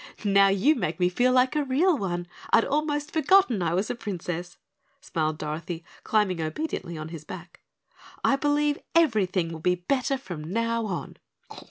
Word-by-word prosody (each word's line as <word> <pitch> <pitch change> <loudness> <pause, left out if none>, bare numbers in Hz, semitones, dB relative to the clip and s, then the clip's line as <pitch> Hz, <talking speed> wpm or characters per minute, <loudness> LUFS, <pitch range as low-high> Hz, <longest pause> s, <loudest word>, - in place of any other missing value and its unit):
"Now 200 -1 +5
you 195 +10 +4
make 300 - -3
me 180 0 +3
feel 245 +8 +2
like 255 +2 +3
a 300 - +2
real 305 +7 +3
one. 175 -7 -3 0.3
I'd 230 - +5
almost 295 +1 -1
forgotten 315 - +4
I 170 -1 0
was 195 +4 0
a - - -1
Princess," 175 -5 -5 0.4
smiled 155 - -2
Dorothy, 160 +3 -5 0.2
climbing 200 -6 +1
obediently 170 - -4
on 155 0 -6
his 160 -2 -8
back. 175 +1 -10 0.6
"I 275 - +4
believe 290 +1 +1 0.2
everything 200 - +2
will 160 - -7
be 180 +3 +2
better 265 +9 0
from 175 - -7
now 230 +1 0
on." 175 -4 -5
200 Hz, 165 wpm, -26 LUFS, 175-275 Hz, 0.6 s, Now